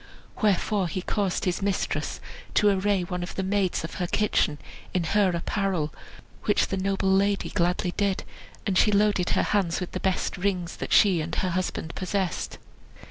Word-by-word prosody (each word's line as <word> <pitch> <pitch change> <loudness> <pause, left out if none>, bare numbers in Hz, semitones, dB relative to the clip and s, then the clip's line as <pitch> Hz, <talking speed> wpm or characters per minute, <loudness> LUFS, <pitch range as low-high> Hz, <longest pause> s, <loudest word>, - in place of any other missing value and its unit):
Wherefore 205 -2 +2
he 180 +2 -4
caused 200 -3 -1
his 180 0 0
mistress 195 -1 -1 0.4
to 210 - +5
array 195 -1 +2
one 180 0 -4
of 175 - -6
the 190 - -1
maids 190 -3 0
of 160 - -6
her 180 - 0
kitchen 175 -7 +1 0.4
in 180 - +2
her 195 +4 +3
apparel; 175 -2 -1 0.5
which - - +2
the 195 - -1
noble 195 0 +1
lady 200 +1 +2
gladly 180 0 +1
did, 200 -2 +1 0.4
and 185 -2 +2
she 210 - +4
loaded 205 -3 +2
her - - +3
hands 190 -5 +1
with 180 - -5
the 185 - -3
best 190 +1 -1
rings 180 -2 -1
that - - -5
she 190 -6 +5
and 160 +2 -4
her 185 - 0
husband 170 -2 -2
possessed. 190 -1 -2
190 Hz, 175 wpm, -26 LUFS, 180-200 Hz, 0.5 s, to